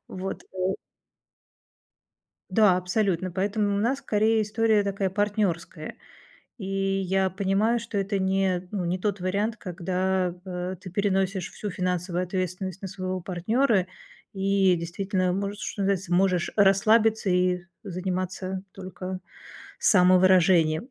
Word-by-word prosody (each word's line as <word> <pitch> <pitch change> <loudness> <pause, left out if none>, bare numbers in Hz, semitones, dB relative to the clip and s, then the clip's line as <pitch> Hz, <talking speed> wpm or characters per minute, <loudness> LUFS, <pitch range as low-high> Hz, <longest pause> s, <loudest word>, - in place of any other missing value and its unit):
вот, 190 +1 -5
э 185 0 -2 1.8
Да, 190 -2 +5
абсолютно, 185 -1 0
поэтому 200 +2 0
у - - 0
нас 250 +6 +1
скорее 220 -3 +2
история 215 0 +2
такая, 195 -1 -1
партнерская, 190 -5 -2 0.6
и 195 -5 -7
я 195 -1 0
понимаю, 200 +5 +1
что 225 -3 -4
это 195 0 -1
не 190 -1 0
ну, 195 -4 -2
не 180 +2 -1
тот 200 -1 -2
вариант, 205 +5 -1
когда, 185 0 -1
э, 180 0 -4
ты 185 - -9
переносишь 195 -1 0
всю 210 - -6
финансовую 180 -1 -2
ответственность 185 +1 -3
на 195 - -5
своего 185 0 -4
партнера 190 +3 +1 0.5
и 195 -1 +2
действительно 185 +2 -1
можешь, 200 +1 -3
что 200 - -4
называется, 190 -2 0
можешь 180 -2 +2
расслабиться 215 +2 +4
и 180 0 +2
з 180 - -19 0.2
заниматься 185 0 -3
только 185 -1 -7 0.6
самовыражением. 180 -2 +4
190 Hz, 125 wpm, -26 LUFS, 180-200 Hz, 1.8 s, Да